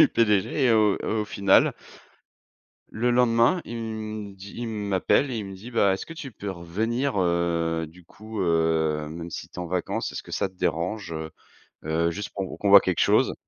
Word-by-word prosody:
du - - +8
PDG 110 +4 +2
et 120 - +4
au 105 -3 +4
et - - -6
au 110 -1 0
final 100 -1 +3 1.2
le 120 +3 0
lendemain, 120 +6 +3
il 120 - -6
me 110 -2 -5
dit 100 +1 -11
il 120 - -4
m'appelle 105 +5 +1
et 125 - -3
il 105 - -4
me 95 0 -8
dit: 105 +6 -10
«Bah, 100 -5 +3
est-ce 95 - -4
que 165 - -9
tu 140 -5 -8
peux 100 -1 -6
revenir, 110 +8 -2
heu, 85 -2 0
du 90 +3 -16
coup, 110 +4 -8
heu, 80 -3 +1
même 85 +1 -6
si - - -7
tu - - -30
es - - -7
en 90 - -3
vacances, 90 0 -2
est-ce - - -5
que - - -13
ça - - 0
te 95 - -24
dérange, 90 +2 -2
heu 80 0 -5 0.6
heu, 85 +2 +1
juste 105 +4 -5
pour 95 -2 -4
qu'on 105 - -1
voit 100 0 +10
quelque 90 -3 -1
chose?» - - +3
100 Hz, 210 wpm, -25 LUFS, 85-110 Hz, 1.2 s, voit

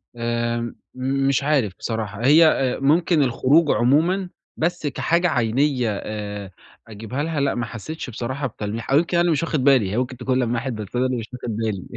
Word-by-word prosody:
آآ، 120 0 -2 0.2
مش 135 +1 0
عارف 135 -10 +1
بصراحة 110 0 -4
هي 155 +4 +7
آآ 135 -4 +1
ممكن 160 +3 +3
الخروج 140 +5 +3
عمومًا 170 +10 +2 0.3
بس 160 -2 -1
كحاجة 170 +5 +1
عَينية 125 0 +1 0.2
آآ، 105 -2 -6 0.4
أجيبها 115 +6 -5
لها 160 -2 -2
لأ 140 0 +1
ما 120 -1 -2
حسيتش 125 +6 -7
بصراحة 130 +4 -3
بتلميح، 110 +2 -5
أو 140 - +5
يمكن 170 +2 +1
أنا - - +4
اللي 175 -1 +2
مش 155 +1 +1
واخد 155 -5 -1
بالي، 130 -9 +4
هي 105 - -2
مُمكن 125 0 -2
تكون 130 +1 0
لمّحت 120 +1 -1
بس 105 +1 -7
أنا 125 +1 +2
اللي 130 -1 -1
مش 115 -1 -5
واخد 120 -3 -5
بالي. 110 -4 -2
130 Hz, 185 wpm, -22 LUFS, 115-145 Hz, 0.4 s, هي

